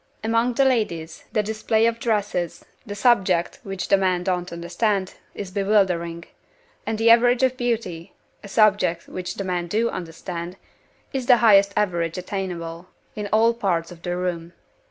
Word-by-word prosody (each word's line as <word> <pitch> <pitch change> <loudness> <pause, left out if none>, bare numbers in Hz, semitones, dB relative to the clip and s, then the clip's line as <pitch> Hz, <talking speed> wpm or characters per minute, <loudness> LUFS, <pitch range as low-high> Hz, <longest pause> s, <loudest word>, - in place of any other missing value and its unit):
Among 230 +2 +1
the 275 - +3
ladies, 170 -11 -1
the 215 - +1
display 220 +1 +1
of 230 0 0
dresses 205 -7 -2 0.2
(a 205 - -4
subject 195 -6 +2
which 195 -2 -5
the 195 - +4
men 185 -2 +1
don't 180 -1 -2
understand) 185 +3 -1 0.2
is 195 -2 -6
bewildering 185 -4 +1 0.6
and 220 - -1
the 230 +1 +5
average 245 +2 +5
of 260 -1 +3
beauty 230 -9 -3 0.3
(a - - -8
subject 200 -5 +2
which 180 -1 -5
the 195 - -4
men 180 -2 -2
do 225 +6 0
understand) 170 +1 -6 0.6
is 260 -3 -3
the 250 - +7
highest 200 -4 +5
average 175 -5 0
attainable, 180 -2 -5 0.3
in 210 -1 -4
all 225 +2 +4
parts 180 -7 -1
of 170 -1 -12
the 175 0 -3
room. 175 -1 -3
195 Hz, 155 wpm, -23 LUFS, 175-225 Hz, 0.6 s, the